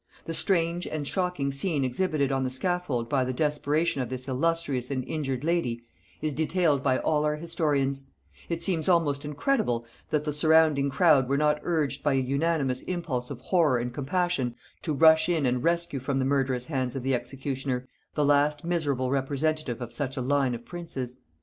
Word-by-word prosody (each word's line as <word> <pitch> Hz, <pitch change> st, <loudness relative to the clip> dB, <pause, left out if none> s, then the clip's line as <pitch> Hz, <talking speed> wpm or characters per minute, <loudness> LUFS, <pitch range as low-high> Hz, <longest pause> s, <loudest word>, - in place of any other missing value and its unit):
The 165 Hz, -, -4 dB
strange 170 Hz, 0 st, 0 dB
and 150 Hz, -2 st, -3 dB
shocking 180 Hz, -7 st, -1 dB
scene 145 Hz, +1 st, -1 dB
exhibited 140 Hz, +1 st, 0 dB
on 135 Hz, 0 st, +1 dB
the 130 Hz, -, 0 dB
scaffold 130 Hz, -3 st, -1 dB
by 130 Hz, +1 st, +1 dB
the 130 Hz, 0 st, -2 dB
desperation 150 Hz, +1 st, 0 dB
of 125 Hz, -, -3 dB
this 130 Hz, 0 st, -4 dB
illustrious 140 Hz, -2 st, 0 dB
and 130 Hz, -2 st, -2 dB
injured 135 Hz, -4 st, -3 dB
lady, 155 Hz, -9 st, 0 dB, 0.4 s
is 155 Hz, -1 st, 0 dB
detailed 160 Hz, -1 st, +1 dB
by 130 Hz, -2 st, +2 dB
all 150 Hz, -1 st, +1 dB
our 150 Hz, 0 st, +1 dB
historians: 150 Hz, -4 st, 0 dB, 0.5 s
it 170 Hz, 0 st, -2 dB
seems 175 Hz, -3 st, +1 dB
almost 155 Hz, -5 st, +2 dB
incredible 145 Hz, -, 0 dB, 0.2 s
that 150 Hz, -1 st, 0 dB
the 150 Hz, -, -1 dB
surrounding 155 Hz, -2 st, +4 dB
crowd 135 Hz, -3 st, +4 dB
were 140 Hz, -, +2 dB
not 150 Hz, 0 st, +2 dB
urged 150 Hz, -5 st, -1 dB
by 145 Hz, -1 st, +2 dB
an 135 Hz, -1 st, +1 dB
unanimous 140 Hz, -2 st, 0 dB
impulse 150 Hz, -9 st, -3 dB
of 130 Hz, -4 st, -7 dB
horror 155 Hz, -4 st, +3 dB
and 120 Hz, 0 st, -3 dB
compassion 145 Hz, -3 st, -1 dB, 0.3 s
to 160 Hz, -, -2 dB
rush 160 Hz, +2 st, +5 dB
in 160 Hz, -5 st, +1 dB
and 125 Hz, 0 st, 0 dB
rescue 170 Hz, -4 st, 0 dB
from 135 Hz, +1 st, -2 dB
the 130 Hz, -, +1 dB
murderous 135 Hz, -2 st, 0 dB
hands 130 Hz, -4 st, -2 dB
of 135 Hz, -, -3 dB
the 135 Hz, +1 st, +1 dB
executioner 130 Hz, +1 st, -3 dB, 0.3 s
the 150 Hz, -, +2 dB
last 145 Hz, +1 st, +3 dB
miserable 145 Hz, -7 st, 0 dB
representative 140 Hz, -1 st, -1 dB
of 120 Hz, -1 st, -5 dB
such 135 Hz, +2 st, -3 dB
a -, -, -1 dB
line 135 Hz, -1 st, +1 dB
of 120 Hz, -, -10 dB
princes. 135 Hz, -8 st, -6 dB
145 Hz, 180 wpm, -27 LUFS, 130-160 Hz, 0.5 s, rush